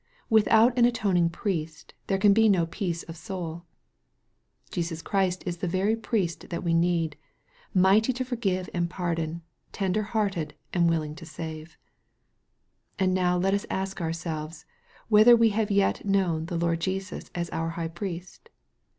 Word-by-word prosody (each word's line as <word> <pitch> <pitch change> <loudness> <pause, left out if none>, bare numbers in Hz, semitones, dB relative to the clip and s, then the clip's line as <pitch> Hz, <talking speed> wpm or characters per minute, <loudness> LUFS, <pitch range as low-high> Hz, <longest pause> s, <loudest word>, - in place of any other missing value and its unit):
Without 220 +2 +5
an 235 - +7
atoning 195 -8 +2
Priest 165 -3 -4
there 195 - +1
can 200 +1 +5
be 220 +1 +5
no 180 -4 +3
peace 170 -1 -3
of 165 - -9
soul. 170 -1 -6 1.1
Jesus 165 -2 -3
Christ 190 -2 0
is 175 -2 -3
the 180 - -3
very 190 +5 +1
Priest 215 -7 -2
that 170 - -4
we 170 -1 +1
need, 165 -2 +1 0.5
mighty 195 +6 +4
to 255 +1 -3
forgive 195 -7 -1
and 175 -1 0
pardon, 170 -2 -3 0.3
ten 195 -2 -1
der 215 - +1
hearted 205 -6 -2 0.2
and 170 -2 +3
willing 155 -2 -1
to 170 - -10
save. 160 0 -8 1.2
And 185 -1 +2
now 180 -1 +2
let 190 +2 +1
us 200 - -1
ask 190 0 -3
ourselves 160 -1 -4 0.4
whether 220 +2 +7
we 230 -1 +4
have 215 0 0
yet 200 -1 +2
known 185 -5 +1
the 170 - -3
Lord 170 0 0
Jesus 190 +1 -4
as 170 -1 -3
our 165 0 -2
High 165 0 -4
Priest 180 - -7
180 Hz, 160 wpm, -27 LUFS, 165-200 Hz, 1.2 s, an